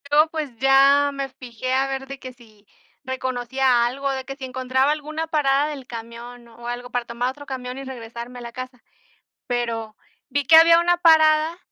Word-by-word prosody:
Yo, 300 +2 +5
pues, 305 -6 -5
ya 275 +2 +5
me 275 -1 -4
fijé 255 -1 -6
a 265 +1 +2
ver 270 0 -4
de 275 0 -8
que 255 -1 -9
si 220 -4 -21 0.4
reconocía 255 -1 0
algo, 275 +3 -2
de 265 -1 -4
que 270 0 -7
si 270 -1 -7
encontraba 260 +2 0
alguna 310 +2 -4
parada 290 -2 +2
del 280 -4 -7
camión 235 +1 -9
o 235 +1 -12
algo 245 +1 -5
para 245 -1 -2
tomar 235 +1 -2
otro 285 +2 -9
camión 255 -2 -6
y 275 - -6
regresarme 240 -1 -8
a - - -10
la 235 0 -8
casa. 255 0 -9 0.6
Pero 230 -3 -3 0.3
vi 285 +1 -1
que 320 - +7
había 335 +1 +8
una 350 +1 +2
parada, 315 -1 +4
260 Hz, 190 wpm, -22 LUFS, 245-285 Hz, 0.6 s, había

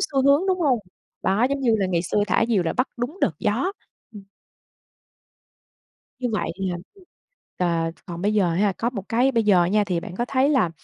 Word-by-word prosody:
xu 270 -2 0
hướng, 280 +2 +5
đúng 370 -1 +1
hông? 275 -7 +3 0.4
Đó, 200 +6 +2
giống 280 0 -1
như 240 -4 +3
là 195 - +1
ngày 175 -2 0
xưa 205 +3 0
thả 230 - +2
diều 210 -6 +2
là 165 - -1
bắt 255 - 0
đúng 250 +9 -4
đợt - - +2
gió, 235 - 0 0.4
ừm. 205 - -9 2.0
Như 250 -1 -1
vậy 210 - -1
là 185 -2 -2 0.8
ờ, 165 -2 0
t - - -30
còn 175 -2 -7
bây 205 +2 +1
giờ 190 -5 +2
ha, 200 +4 +2
có 230 +5 -2
một 210 -6 -6
cái 245 +4 +3
bây 230 -3 +1
giờ 190 -5 +4
nha 205 +4 +2
thì 180 -4 -1
bạn 180 +1 -9
có 240 - -1
thấy 265 +2 +2
là, 265 - +3
210 Hz, 210 wpm, -23 LUFS, 185-255 Hz, 2.0 s, hướng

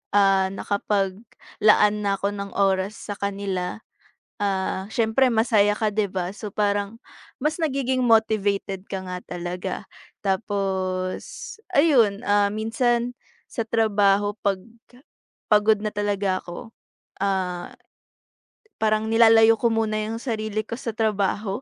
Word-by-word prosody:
ah, 195 -1 +4
nakapaglaan 205 +1 +1
na 200 -1 +1
ako 200 - 0
ng 200 -1 -6
oras 195 +1 +1
sa 205 - -6
kanila. 195 -1 -3 0.6
Ah, 190 -1 -1
siyempre 235 +2 +3
masaya 220 -2 +3
ka, 220 - +1
'di 210 -1 +1
ba? 185 -1 -2
So 210 -1 -6
parang 205 +1 -1 0.5
mas 305 +1 +1
nagiging 265 -4 0
motivated 205 -4 +1
ka 190 -1 -4
nga 180 0 -5
talaga. 180 +1 -5 0.4
Tapos, 190 -2 -2 0.2
ayun, 245 -9 +4
ah, 205 0 +3
minsan 235 +2 0 0.3
sa 230 - -3
trabaho 205 -2 +2
'pag 195 -2 +2 0.9
pagod 210 0 +4
na 215 - -1
talaga 200 -2 0
ako, 175 +5 -9 0.5
ah, 185 -3 -2 1.1
parang 215 0 +2
nilalayo 225 0 +6
ko 235 - +2
muna 220 -1 0
'yong 220 +2 -4
sarili 215 -4 -2
ko 230 - -5
sa 230 - -3
trabaho. 205 0 -1
205 Hz, 120 wpm, -24 LUFS, 195-220 Hz, 1.1 s, nilalayo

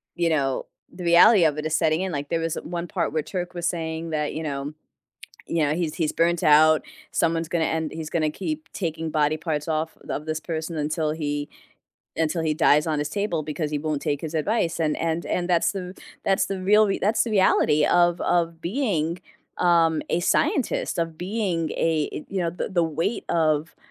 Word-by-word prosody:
you 170 -1 +1
know 135 -4 0 0.3
the 180 - -7
reality 175 +3 +7
of 150 -1 +1
it 150 - -4
is 155 0 0
setting 160 +1 +2
in 190 -1 -2
like, 145 -1 -4
there 165 - 0
was 165 -1 -1
one 175 +1 -4
part 170 -4 -1
where 155 -1 -1
Turk 180 -2 -5
was 170 0 -1
saying 165 -1 -3
that, 150 -1 -1
you 160 - -3
know 140 0 -4 0.7
you 165 -1 0
know, 145 - +1
he's 165 -3 -2
he's 160 -4 -1
burnt 170 0 +2
out, 155 +1 +6 0.3
someone's 165 -1 0
gonna 165 -2 +1
end 160 -1 -1
he's 160 -1 -6
gonna 155 -2 +1
keep 310 - -5
taking 165 -3 -3
body 155 0 +1
parts 155 -2 -3
off 160 0 -2
of 150 - -3
this 155 0 -2
person 160 0 -4
until 155 +1 -1
he 145 -2 -3 0.7
until 160 +1 0
dies 150 -1 +4
on 155 - 0
his 150 +1 -2
table 190 -6 -1
because 150 0 -3
he 150 - 0
won't 150 -1 -2
take 145 -1 -1
his 160 0 -5
advice, 170 +1 0
and 155 -2 +1
and 165 +1 -1
and 180 0 -2
that's 170 -2 +3
the 185 -1 -5 0.3
that's 195 0 +2
the 195 -1 -4
real 210 +2 +5
rea 195 - -1
that's 215 +4 +2
the 230 - -4
reality 170 -6 +4
of 175 0 +3
of 170 -1 0
being, 175 - -1 0.4
um, 165 -2 +3
a - - +1
scientist, 305 - +1
of 165 -1 -2
being 180 -4 -1
a 155 -2 -1
you 195 - -2
know, 170 -1 0
the 175 - -4
the 180 -3 +1
weight 165 +7 -2
of 155 -2 +1
165 Hz, 200 wpm, -24 LUFS, 155-175 Hz, 0.7 s, reality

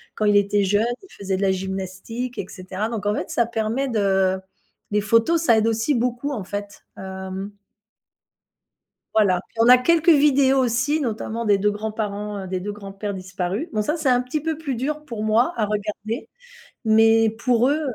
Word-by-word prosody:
quand 215 - -1
il 205 -1 +5
était 205 0 +2
jeune, 205 +3 +2 0.2
il 385 - -16
faisait 195 -1 -1
de - - -4
la 195 -1 +3
gymnastique» 190 +6 -4
et - - -3
cetera. 185 +3 -4
Donc 215 -3 -4
en 205 - +2
fait, - - -4
ça 235 - +1
permet 230 +4 -2
de 190 -3 +1 0.5
les 210 0 +2
photos, 230 +10 +3
ça 230 -7 +5
aide 220 +1 +2
aussi 225 +6 +1
beaucoup, 245 +3 -1
en 210 -9 -4
fait, 205 0 -7
hem 190 +1 -6 1.6
Voilà. 200 -5 +3
Puis, - - -26
on 235 - +5
a 250 - +10
quelques 330 +5 +3
vidéos 280 -3 +5
aussi, 255 +5 +1
notamment 230 -2 -3
des 205 -1 +4
2 210 +1 +2
grands-parents, 210 -2 -4
des 185 0 -2
2 205 +3 -4
grands-pères 200 0 -6
disparus. 185 - -4
Bon, 215 -1 0
ça, 300 - 0
c'est 310 -5 0
un 250 0 +4
petit 265 +4 -3
peu 320 -1 -2
plus 285 -6 -3
dur 300 +5 -3
pour 225 -5 -5
moi 230 +9 +2
à 215 - +1
regarder. 210 +2 -4 0.6
Mais 225 0 +5
pour 235 +2 +1
eux, 305 +2 +1
220 Hz, 185 wpm, -22 LUFS, 200-250 Hz, 1.6 s, a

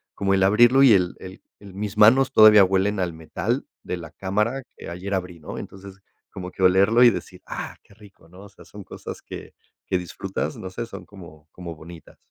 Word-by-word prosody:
como 95 -1 0
el 95 - +2
abrirlo 120 +7 +5
y 130 -5 +7
el 90 -3 +1
el 95 0 -11 0.2
el 100 -2 -13
mis 100 +2 -5
manos 130 +6 +5
todavía 105 -3 +8
huelen 95 +2 0
al 90 -2 -2
metal 80 0 -4 0.2
de 90 - -4
la 80 -2 -10
cámara 105 - -2
que - - -10
ayer 90 +4 -6
abrí, 90 -2 -4
¿no? 75 - -9
Entonces 95 0 -11 0.3
como 90 -2 -8
que 95 - -5
olerlo 100 +6 +4
y 120 - +8
decir: - - -8
"¡Ah, - - -7
qué - - -22
rico!", 100 -5 -19
¿no? 90 +3 -15
O 100 - -13
sea, 100 - -18
son 105 -1 -12
cosas - - -9
que - - -10 0.3
que 95 - -1
disfrutas. 90 -2 -5
No 95 - -7
sé, 120 +5 -5
son - - -10
como 85 -6 -15
como 85 -2 -9
bonitas. 80 +1 -14
95 Hz, 210 wpm, -23 LUFS, 90-105 Hz, 0.3 s, todavía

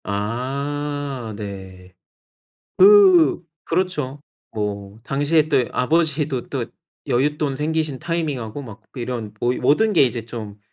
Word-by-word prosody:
아. 135 +4 -3
네. 95 -3 -9 0.9
그 185 -6 +6 0.2
그렇죠. 165 -6 -2 0.3
뭐 100 -1 -4
당시에 145 +3 +2
또 135 -5 +3
아버지도 150 -2 0
또 - - -3 0.4
여윳돈 145 +2 0
생기신 155 -1 -1
타이밍하고 145 -8 -3
막 110 -6 -11
이런 120 -4 -5
모이 125 +1 0
모든 215 +9 +3
게 175 - +5
이제 120 -3 0
좀 110 -3 -8
135 Hz, 215 characters per minute, -21 LUFS, 115-150 Hz, 0.9 s, 그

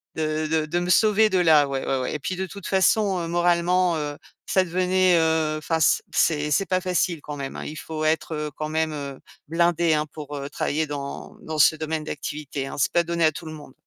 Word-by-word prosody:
de 155 0 -1
de 160 0 0
de 175 +3 0
me 175 0 -3
sauver 215 +2 +4
de 190 - +1
là, 155 -4 +5
ouais, 135 -1 -3
ouais, 135 - 0
ouais. - - -3
Et - - -3
puis 185 +6 -3
de 190 +1 -3
toute 200 0 -9
façon, 195 0 +2
heu, 165 - -4
moralement, 175 +1 +2
heu, 145 -1 -4 0.3
ça 190 - +3
devenait, 185 +1 +2
heu, 160 -1 +1
enfin, 160 +2 -1
c 140 - +3
c'est 150 -2 +1
c'est 195 +6 +2
pas 185 +1 +1
facile 175 -3 0
quand 150 -1 -7
même, 135 -1 -5
hein. - - -6
Il 155 - -7
faut 155 -1 -5
être, 160 +1 0
heu, 150 -1 -4
quand 155 0 -3
même, 160 0 0
heu, 140 -2 -6 0.3
blindé, 170 0 +2
hein, 150 0 0
pour, 150 -2 -8
heu, 140 +1 -5
travailler 155 +1 -1
dans 140 -1 -6
dans 155 -1 -5
ce 155 - +6
domaine 155 0 -3
d'activité, 145 -2 -5
hein. - - -7
C'est - - +2
pas 175 - +3
donné 170 0 -1
à 155 - +4
tout 160 - -9
le 155 - -7
monde. 145 -4 -12
160 Hz, 240 wpm, -24 LUFS, 150-175 Hz, 0.3 s, ce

